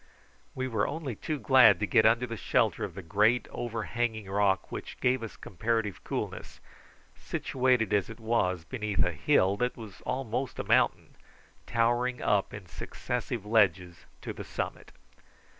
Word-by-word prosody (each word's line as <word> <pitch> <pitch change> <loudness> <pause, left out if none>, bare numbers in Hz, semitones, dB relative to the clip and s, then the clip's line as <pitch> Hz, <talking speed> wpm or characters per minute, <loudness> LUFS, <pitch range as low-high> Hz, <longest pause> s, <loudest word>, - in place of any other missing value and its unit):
We 130 0 -2
were 110 -5 0
only 145 -6 -4
too 155 +8 -3
glad 130 -9 +6
to 105 - +1
get 110 +1 +4
under 115 +2 +3
the 115 -1 -5
shelter - - +1
of - - -5
the - - -7
great 105 +8 +2
overhanging 115 -2 -3
rock, 100 -1 +1
which - - -7
gave 130 0 +2
us 115 - -7
comparative 110 +1 -2
coolness, - - -5 0.6
situated 125 -5 0
as 100 -3 +2
it 115 0 -9
was 95 -7 0
beneath 105 -5 -1
a 90 - 0
hill 95 +5 +2
that 125 +3 -1
was 110 -5 -10
almost 130 0 -3
a - - -2
mountain, - - +1 0.5
towering 120 +2 +1
up 100 -2 +1
in 100 -2 -8
successive 120 +4 -4
ledges 95 -5 +2 0.2
to - - -5
the - - -7
summit. - - -5
110 Hz, 155 wpm, -29 LUFS, 100-125 Hz, 0.6 s, glad